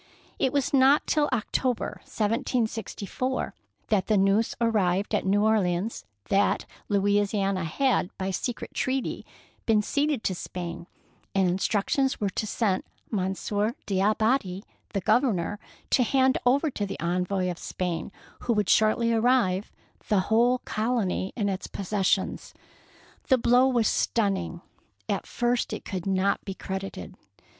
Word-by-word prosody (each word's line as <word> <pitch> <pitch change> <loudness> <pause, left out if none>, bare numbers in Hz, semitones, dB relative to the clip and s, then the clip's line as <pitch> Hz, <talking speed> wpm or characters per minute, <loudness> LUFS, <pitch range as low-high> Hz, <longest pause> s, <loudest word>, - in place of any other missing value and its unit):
It 265 - +2
was 285 +2 0
not 275 +2 +5
till 295 -2 +2
October, 250 +1 -1
1764, 230 +2 -2 0.4
that 205 -4 +2
the 215 - +3
news 195 +3 +2
arrived 205 -4 +1
at 205 - 0
New 205 +2 +3
Orleans 200 - +1 0.2
that 200 +1 +2 0.2
Louisiana 200 -2 +1
had, 255 - +1
by 190 0 -2
secret 235 +6 -4
treaty, 265 -1 -2 0.4
been 215 -2 +4
ceded 285 0 0
to 190 - 0
Spain, 175 -1 -6 0.5
and 190 -1 +3
instructions 205 +8 +1
were 200 -2 0
sent 215 -2 0
to - - -10
Monsieur 205 +3 -1
D'Abadie, 205 0 +1 0.3
the 195 - 0
Oov 240 - +4
ernor, 205 -6 -1 0.3
to - - +4
hand 260 +1 +3
over 280 +5 +3
to 205 -4 -3
the - - -6
envoy 180 +2 0
of 175 - -8
Spain, 175 0 -3 0.3
who 240 - 0
would 210 -3 0
shortly 230 +2 +3
arrive, 225 -5 +2 0.4
the 205 -3 +3
whole 245 +2 +4
colony 215 -4 -1
and 210 -4 0
its 195 -1 -3
possessions. 195 0 -1 0.7
The 260 - +5
blow 245 +2 +4
was 240 -5 +2
stunning! 190 -6 0 0.5
At - - -2
first 240 0 0
it - - -5
could 185 -1 -4
not 195 +1 +1
be 195 - -5
credited. 190 - -6
210 Hz, 135 wpm, -27 LUFS, 190-240 Hz, 0.7 s, not